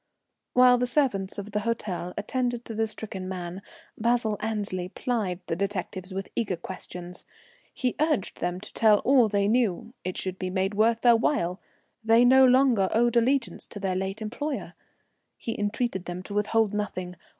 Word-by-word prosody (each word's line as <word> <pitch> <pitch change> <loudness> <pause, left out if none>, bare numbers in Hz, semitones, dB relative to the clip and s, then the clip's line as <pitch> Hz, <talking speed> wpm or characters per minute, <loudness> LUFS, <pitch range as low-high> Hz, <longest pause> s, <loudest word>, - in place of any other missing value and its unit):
While 250 0 +6
the 250 - +1
servants 240 -8 +1
of 205 +1 -6
the 210 - 0
hotel 205 -5 -3
attended 245 +2 -2
to 225 - -6
the 220 +1 0
stricken 195 -4 -6
man, 180 0 -5 0.3
Basil 230 -1 +1
Annesley 205 -5 -3
plied 205 -7 -2
the 165 - -2
detectives 190 0 -3
with 195 +1 -4
eager 210 -6 0
questions. 180 0 -8 0.5
He 250 -2 -2
urged 305 - 0
them 175 +1 -2
to 215 - -11
tell 215 -2 +5
all 255 -4 +5
they 200 -1 +1
knew; 225 -1 0
it 185 0 -3
should 185 0 -3
be 185 - -2
made 190 +2 -1
worth 225 +2 +2
their 240 -1 +6
while; 200 - 0 0.4
they 225 +2 +5
no 265 +2 +7
longer 250 -6 +4
owed 240 +1 +2
allegiance 250 +2 +1
to 205 - -8
their 190 -2 -1
late 190 +3 -3
employer. 275 +7 -4 0.6
He 225 - -4
entreated 205 -2 -1
them 180 +1 -5
to 200 - -8
withhold 210 +1 +1
nothing. 185 -4 -3
210 Hz, 170 wpm, -27 LUFS, 190-240 Hz, 0.6 s, no